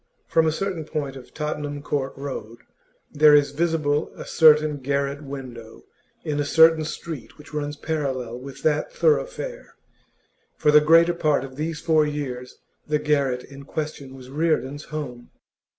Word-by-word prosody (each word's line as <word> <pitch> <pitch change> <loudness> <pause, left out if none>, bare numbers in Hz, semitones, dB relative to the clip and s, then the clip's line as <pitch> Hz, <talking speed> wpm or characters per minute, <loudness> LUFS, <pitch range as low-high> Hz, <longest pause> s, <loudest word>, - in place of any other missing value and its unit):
From 165 -1 +2
a - - +3
certain 180 0 -3
point 145 -3 -4
of 130 -2 -12
Tottenham 150 -1 -4
Court 140 -2 -2
Road 120 -5 -6 0.5
there 150 0 +6
is 145 -1 +4
visible 155 -1 0
a - - -8
certain 155 -2 +5
garret 140 +1 -2
window 130 -5 -9 0.4
in 150 -3 -2
a - - +2
certain 160 +2 +5
street 160 -3 -7
which 150 0 -15
runs 145 0 -3
parallel 130 -6 -3
with 135 +1 -10
that 150 -1 +1
thoroughfare; - - -1 0.8
for 150 - +3
the 150 0 +7
greater 165 +3 +5
part 155 -5 +1
of 135 -1 -9
these 155 +2 -3
four 160 -2 +3
years 135 -4 -4 0.3
the 150 0 +2
garret 140 -4 0
in 140 0 -12
question 140 -2 -5
was 130 -1 -12
Reardon's 145 -2 -1
home. 125 -6 -6
150 Hz, 150 wpm, -24 LUFS, 135-155 Hz, 0.8 s, the